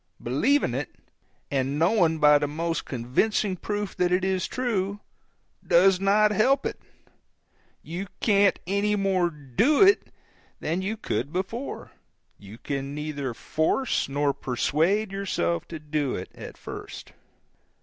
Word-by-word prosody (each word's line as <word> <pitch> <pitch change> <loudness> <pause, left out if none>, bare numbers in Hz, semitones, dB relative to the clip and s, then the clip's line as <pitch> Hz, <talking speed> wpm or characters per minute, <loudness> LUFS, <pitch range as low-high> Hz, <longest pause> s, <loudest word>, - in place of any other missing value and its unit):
Believing 150 - +1
it, 135 +2 -4 0.6
and 135 +1 0
knowing 170 -1 +3
by 150 -1 +6
the 145 - -1
most 165 +3 -2
convincing 165 - 0
proof 205 +2 -4
that 180 0 +2
it 180 +1 +2
is 190 -1 0
true, 205 -6 -2 0.6
does 185 +2 +4
not 205 +2 +4
help 260 +6 +2
it: - - -3 1.0
you 175 +5 -5
can't 200 -3 +3
any 200 +3 +1
more 190 -3 +1
DO 150 - +2
it 395 +1 +4 0.5
than 165 +4 -2
you 210 +4 -3
could 140 - -3
before; 195 +9 -4 0.5
you 100 +2 -12
can 140 +2 -4
neither 145 -5 -4
force 160 - 0
nor 140 0 +1
persuade 165 - 0
yourself 85 - -1
to 165 - -6
do 150 -3 -2
it 90 - -6
at - - -10
first. - - -9
175 Hz, 130 wpm, -26 LUFS, 145-205 Hz, 1.0 s, by